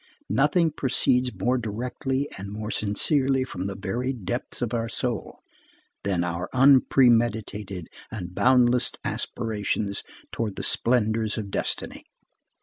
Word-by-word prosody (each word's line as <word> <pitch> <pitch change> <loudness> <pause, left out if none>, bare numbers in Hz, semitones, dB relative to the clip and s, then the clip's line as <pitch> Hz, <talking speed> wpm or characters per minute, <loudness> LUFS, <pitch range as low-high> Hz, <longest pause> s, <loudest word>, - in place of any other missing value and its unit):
Nothing 155 +4 +3
proceeds 125 -2 +2
more 120 +6 0
directly 125 +5 -2
and 100 +1 -7
more 105 +1 -5
sincerely 130 +6 +2
from 95 -7 -5
the 100 0 -3
very 120 +7 -2
depth 120 +1 -3
of 120 0 -3
our 115 -1 -1
soul, 120 -5 -4 0.6
than 95 -3 0
our 90 +1 -3
unpremeditated 115 - +3 0.2
and 90 -5 -6
boundless 125 +1 +4
aspirations 105 -3 -2 0.3
towards 110 -4 -3
the - - -5
splendors 110 -2 +1
of 100 -3 -5
destiny. - - -3
115 Hz, 120 wpm, -25 LUFS, 100-125 Hz, 0.6 s, boundless